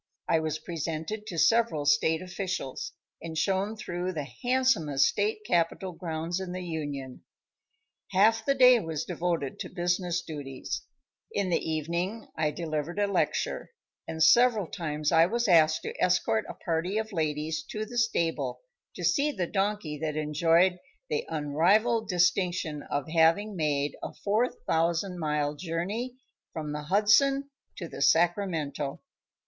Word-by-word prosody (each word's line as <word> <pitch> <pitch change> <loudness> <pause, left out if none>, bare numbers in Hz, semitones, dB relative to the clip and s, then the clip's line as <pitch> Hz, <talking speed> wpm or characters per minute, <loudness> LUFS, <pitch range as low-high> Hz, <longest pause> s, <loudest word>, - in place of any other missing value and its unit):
I 165 - +3
was 155 -1 -2
presented 165 +6 -4
to 175 - -5
several 225 -5 +3
state 160 +3 +3
officials, 180 -6 -4 0.3
and 160 -1 -6
shown 195 +5 0
through 180 -2 -3
the 150 -4 -4
handsomest 245 - +2
state 210 +1 0
capitol 175 +1 0
grounds 165 +1 -3
in 185 -2 -5
the 185 0 -4
Union. 145 -6 -5 0.9
Half 220 +4 +4
the 275 +4 +2
day 250 -2 +7
was 160 -6 -4
devoted 165 -6 -2
to - - -5
business 175 -1 -1
duties; 140 -5 -5 0.5
in 195 -3 -1
the - - +3
evening 170 +8 -2
I 155 -1 +1
delivered 155 +2 -4
a 205 - +3
lecture; 200 -2 -1 0.4
and 160 0 0
several 225 +3 +5
times 155 -4 -2
I 165 0 +6
was 235 +4 0
asked 160 -4 +5
to - - -4
escort 145 -11 +2
a - - -6
party 170 +5 -2
of 220 0 -2
ladies 155 -1 -1
to 215 0 -3
the 240 +2 -3
stable 170 -8 0 0.3
to - - -6
see 295 0 +2
the 185 -10 -2
donkey 195 -5 -2
that 155 -1 -2
enjoyed 165 +4 +3 0.3
the 150 - -1
unrivaled 180 +10 +2
distinction 180 -3 +1
of 145 -2 -2
having 165 +6 +3
made 145 -3 0
a - - -6
4,000 180 -5 0
mile 150 -2 0
journey 185 - -3 0.4
from 155 -2 -4
the 150 0 -5
Hudson 270 - +3 0.3
to 170 - -5
the - - -8
Sacramento. 160 -3 +1
170 Hz, 140 wpm, -28 LUFS, 155-200 Hz, 0.9 s, day